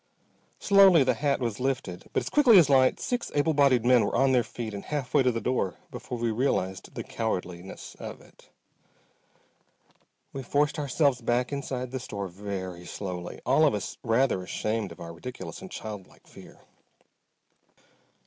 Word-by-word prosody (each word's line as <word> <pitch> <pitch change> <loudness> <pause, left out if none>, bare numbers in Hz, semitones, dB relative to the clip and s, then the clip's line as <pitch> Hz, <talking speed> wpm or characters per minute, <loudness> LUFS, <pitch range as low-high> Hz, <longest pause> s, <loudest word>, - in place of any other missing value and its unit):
Slowly 195 -6 +6
the 130 -1 +2
hat 140 +4 0
was 115 -5 -3
lifted, 130 -9 -3
but - - 0
as - - -5
quickly 260 -8 +6
as 155 -6 +6
light 130 -1 +4
six 245 -1 -3
able 145 +2 +2
bodied 135 -5 +3
men 125 -1 +5
were - - -1
on 135 +2 +3
their 125 -2 +4
feet 115 -2 -6
and 100 - -6
half 140 -4 -4
way 145 - +5
to 130 -1 +3
the 115 - -2
door 115 -5 -1 0.2
before 125 - -6
we 115 -1 0
realized 105 -6 -1
the - - -4
cowardliness 90 -4 -5
of - - -7
it. - - -21 1.8
We 135 - -4
forced 145 +4 0
ourselves 140 -2 +1
back 120 +3 0
inside 130 -3 -4
the 130 - -3
store 100 -6 -5
very 95 -2 -6
slowly, 90 -3 -6
all - - +4
of - - +1
us - - -5
rather 115 -3 +2
ashamed 105 +3 -3
of - - -12
our 85 0 -8
ridiculous 125 +10 -8
and 190 - -9
childlike 105 - -9
fear. - - -15
125 Hz, 170 wpm, -27 LUFS, 100-140 Hz, 1.8 s, Slowly